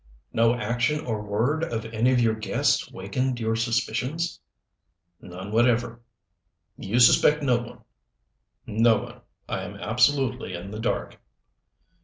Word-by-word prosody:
"No 115 +1 +3
action 120 +7 -1
or 110 -3 -2
word 115 +10 -1
of 115 -7 -3
any 115 +3 +1
of 125 - +3
your 115 -2 +3
guests 110 0 0
wakened 120 +7 -2
your 110 0 0
suspicions?" 120 +8 -1 0.8
"None 95 +3 -9
whatever." 115 0 +1 0.7
"You 115 +6 -1
suspect 150 +5 +5
no 125 -3 +3
one?" 120 - -10 0.8
"No 110 +1 +3
one. - - -9 0.3
I - - -3
am - - -7
absolutely 130 -9 +1
in 90 +3 -8
the 105 - -6
dark." 110 - -3
115 Hz, 130 wpm, -25 LUFS, 110-125 Hz, 0.8 s, suspect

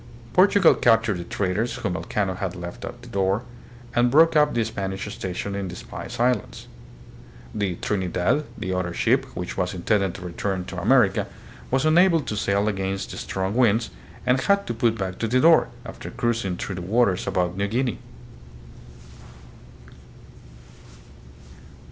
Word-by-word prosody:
Portugal 190 -1 +6
captured 115 -5 +2
the - - -4
traders 100 +6 -1
whom 95 -5 -3
Elcano 95 0 -2
had 95 -1 -4
left 85 -1 -8
at 120 - -8
Tidor, 100 -2 0 0.5
and 120 +1 +3
broke 160 +5 +5
up 150 -1 +5
the 115 - +2
Spanish 95 -3 -4
station 95 +2 -4
in 100 -1 -3
the 90 - -7
Spice - - -8
Islands. 125 +1 0 0.9
The 100 -4 -1
" - - -18
Trinidad," 95 - 0
the 95 0 -3
other 90 -2 -2
ship, - - +2
which - - -5
was 90 +1 -1
intended 95 +1 0
to 95 - -8
return 90 +1 -3
to 90 -1 -6
America, 110 -1 +3 0.4
was 130 +3 +1
unable 165 +1 +5
to 125 -6 -4
sail 100 0 +1
against 95 -1 -2
the - - -7
strong 95 +1 -3
winds, 115 -2 +2 0.3
and 125 +1 +3
had 200 +5 +2
to - - -3
put 115 -1 +1
back 95 -2 -4
to 115 - 0
Tidor, 150 +8 +5 0.2
after - - -8
cruising 115 -7 -1
through 95 - -4
the - - -4
waters 100 0 +1
about 90 -2 0
New 100 +1 -1
Guinea. 120 +3 -1
100 Hz, 155 wpm, -24 LUFS, 95-120 Hz, 0.9 s, Portugal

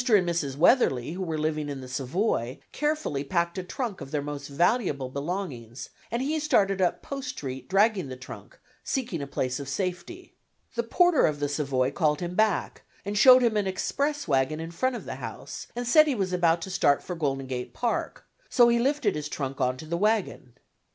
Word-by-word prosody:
and 200 -5 +5
Mrs. 150 -6 -1
Weatherly, 155 - +3
who 180 +3 -5
were 165 -4 -2
living 155 -1 -1
in 140 -1 -5
the 130 - -8
Savoy, 130 - -1
carefully 300 - -1
packed 170 +3 -1
a - - -4
trunk 220 +3 -4
of 135 - -7
their 145 0 -2
most 145 -1 -5
valuable 150 - +1
belongings, 140 - -5 0.2
and 235 +3 -1
he 310 +3 0
started 195 -10 +2
up 180 - +1
Post 275 -2 -5
Street 130 - -6
dragging 195 -3 +3
the 130 - -6
trunk, 130 0 -11 0.3
seeking 230 - -2
a 140 - -4
place 130 -1 -2
of 140 -1 -6
safety. 185 - -4 0.4
The 235 - 0
porter 350 +7 +4
of 150 -2 -2
the 145 - 0
Savoy 140 -3 0
called 150 +1 +1
him 175 0 -4
back, 215 -1 +1 0.2
and 205 +1 -3
showed 255 +3 +8
him 230 -2 +2
an 205 -2 +1
express 285 +9 -1
wagon 135 +1 +1
in 165 +1 -6
front 255 +9 0
of - - -7
the - - -5
house, - - -7
and 245 0 -3
said 310 +5 +6
he 280 - +1
was 190 -4 -1
about 170 -2 +2
to 190 - -6
start 145 -6 +2
for 180 - -5
Golden 135 -4 -1
Gate 125 -1 -5
Park, 240 -2 -2 0.2
so 240 -2 +5
he 235 0 +3
lifted 270 -3 +1
his 150 -1 -4
trunk 135 -3 -4
on 125 0 +1
to 155 - -9
the 170 +2 -2
wagon. 205 - 0
175 Hz, 205 wpm, -27 LUFS, 140-225 Hz, 0.4 s, showed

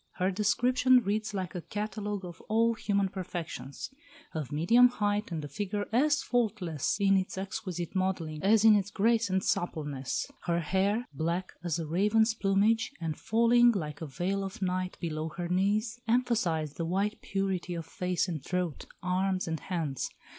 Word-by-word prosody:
Her 185 +1 0
description 245 +5 +3
reads 215 +2 -1
like 185 -5 -4
a 180 - -4
catalogue 210 0 -4
of 175 -2 -9
all 230 +2 +3
human 200 -3 0
perfections. 175 - -6 0.4
Of 155 -3 -4
medium 205 +12 +6
height 210 -4 -1
and 155 -3 -3
a - - -5
figure 205 +7 -3
as 290 +4 +3
faultless 210 - 0
in 195 -1 +4
its 190 0 -2
exquisite 185 -3 -4
modelling 175 -5 -1
as 215 +2 +4
in 220 -1 +8
its 200 -1 +1
grace 225 +2 +2
and 190 0 +1
suppleness; 145 -6 -1 0.2
her 170 -1 +1
hair, 200 +8 0
black 170 +5 -2
as 170 -2 -1
a 165 - -3
raven's 210 +7 +3
plumage, 215 +3 +2
and 160 -2 -2
falling, 235 +4 +4
like 150 -7 -4
a 160 - -4
veil 185 +8 -2
of 195 -1 -6
night, 185 -1 -2
below 160 -2 -3
her 175 -1 -2
knees, 210 +6 +1
emphasised 215 - +1
the 165 - -2
white 200 +4 -1
purity 190 -3 -2
of 165 -1 -5
face 180 +2 -1
and 160 -6 -4
throat, 180 -3 -2 0.2
arms, 185 0 0
and 160 -1 -2
hands. 160 -8 -3
190 Hz, 165 wpm, -30 LUFS, 170-215 Hz, 0.4 s, in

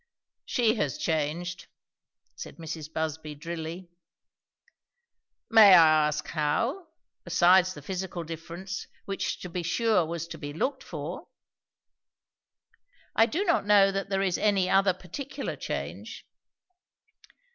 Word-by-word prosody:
"She 230 -3 +2
has 145 - -1
changed," 160 +3 -2 0.7
said - - -9
Mrs. 160 -2 -7
Busby 160 -1 -4
drily. 170 +3 -7 1.6
"May 205 -4 +9
I 155 -3 +6
ask, 150 0 -3
how? 230 - -1 0.4
besides 180 +2 +4
the 145 - -11
physical 185 0 -4
difference, 170 +3 -7 0.2
which 195 -1 -3
to - - -6
be 175 +1 -3
sure 215 +2 +2
was 170 0 -4
to - - -8
be 145 -1 -6
looked 265 - -2
for?" - - -7 1.9
"I 225 - +5
do 345 +10 -1
not 335 - +1
know 200 -1 +6
that 195 0 -3
there 195 -1 0
is 185 -3 0
any 200 -3 +2
other 195 -1 +4
particular 275 - -6
change." - - -6
180 Hz, 120 wpm, -27 LUFS, 160-195 Hz, 1.9 s, May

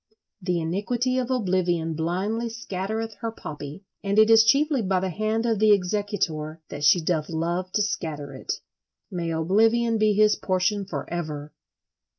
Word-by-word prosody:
"The 180 -2 0
iniquity 235 +10 0
of 250 -1 -2
oblivion 180 -8 0
blindly 190 +9 -1
scattereth 220 0 -4
her 230 -1 -3
poppy," 150 -2 -8 0.2
and 200 +1 0
it 220 +1 +6
is 225 0 +8
chiefly 280 +2 +3
by 190 -2 +1
the 185 0 -2
hand 215 +4 -1
of 225 -3 +1
the 215 0 +6
executor 180 -5 -1
that 145 - -6
she 150 +5 +6
doth 160 -2 -1
love 170 +3 -2
to 210 - +2
scatter 155 -8 -4
it. 130 - -5 0.6
May 170 -3 -3
oblivion 220 +8 +2
be 215 0 +4
his 215 +1 +4
portion 190 +2 0
for 195 - -5
ever! 150 -3 -4
195 Hz, 160 wpm, -25 LUFS, 165-220 Hz, 0.6 s, is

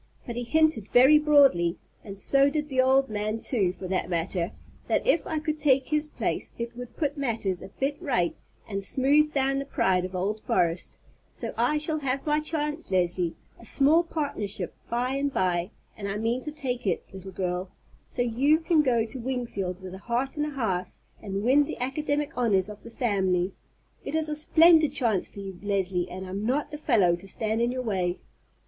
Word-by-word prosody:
But 235 - -5
he 240 - -2
hinted 310 -4 +2
very 265 +5 +7
broadly—and 215 - +2
so 275 +7 +5
did 300 0 -2
the 260 -2 +3
old 265 +1 +4
man, 215 0 -2
too, 215 -6 +1
for 185 - -8
that 185 0 -1
matter—that 170 +1 -3
if 340 -9 +2
I 315 - -2
could 310 0 -2
take 270 -3 +3
his 300 0 +1
place - - -3
it 235 0 -5
would 245 0 -9
put 290 -2 -1
matters 220 -8 -1
a - - -8
bit 275 - -3
right 185 - 0 0.3
and 195 -2 -4
smooth 285 +7 +3
down 275 -1 +1
the 275 - -4
pride 190 -10 +1
of 185 0 -5
old 205 +4 -2
Forrest; 170 -1 0 0.3
so - - -6
I 300 - +2
shall 310 +1 +1
have 270 -1 -2
my 300 0 +2
chance, 305 0 -2
Leslie—a 180 +2 -2
small 290 +8 +4
partnership 220 - -3 0.2
by 245 +2 0
and 280 +1 -1
by; 180 -5 0 0.3
and 200 -2 -5
I 200 - -2
mean 230 +4 -1
to 300 - -4
take 255 -7 -3
it, 180 - 0
little 190 0 -9
girl, 180 0 -3 0.4
so 245 - -1
you 260 +6 +3
can 320 -1 +2
go 240 -6 +2
to 245 +3 -8
Wingfield 230 -7 -4
with 185 -1 -7
a 190 - -8
heart 245 +6 -2
and 300 0 -1
a 295 - -7
half, 190 -8 -2 0.2
and 200 -1 -4
win 275 +5 +4
the - - -6
academic 290 +3 -2
honors 210 -6 +2
of 210 0 -10
the - - -11
family. 190 -6 0 0.5
It 285 - -4
is 315 -1 0
a 300 - -1
splendid 315 -1 +5
chance 230 -9 +2
for 200 - -10
you, 190 -2 -8
Leslie, 190 -3 -1
and 185 +1 -7
I'm 190 +2 -5
not 280 +6 -1
the 295 - -6
fellow 190 - +3
to 190 +3 -11
stand 220 +3 -2
in 240 +1 +1
your 255 0 -3
way." 185 -5 -1
240 Hz, 195 wpm, -27 LUFS, 190-285 Hz, 0.5 s, very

